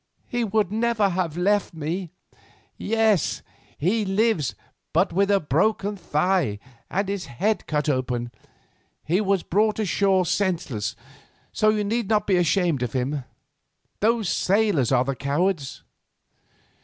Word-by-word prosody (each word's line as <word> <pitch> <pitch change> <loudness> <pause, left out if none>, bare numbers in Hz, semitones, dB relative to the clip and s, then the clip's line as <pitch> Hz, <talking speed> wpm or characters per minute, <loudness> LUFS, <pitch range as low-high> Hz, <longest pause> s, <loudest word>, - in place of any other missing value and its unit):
He 240 -1 -1
would 210 -3 0
never 220 -2 +1
have 175 -3 -2
left 200 0 +1
me." 165 +4 -3 0.7
"Yes, 220 -4 +1 0.3
he 205 +8 +1
lives, 195 - +1 0.4
but - - +2
with 195 +3 +2
a 200 -1 +4
broken 200 +7 0
thigh 175 - 0 0.3
and 195 +1 -1
his 200 -3 -3
head 200 - -1
cut 150 0 -1
open. 125 -3 -1 0.7
He 180 +6 +1
was 195 -3 +1
brought 215 +3 +1
ashore 195 -2 +2
senseless, 160 - -1 0.6
so 215 - +3
you 215 -1 +1
need 225 +1 -1
not 210 -2 +2
be 190 -3 +2
ashamed 175 -4 +2
of 125 -2 -2
him. 130 +1 -2 0.7
Those 225 -1 +2
sailors 195 - +2
are 130 -1 +3
the 135 0 -2
cowards." 145 +2 -1
190 Hz, 130 wpm, -24 LUFS, 150-210 Hz, 0.7 s, a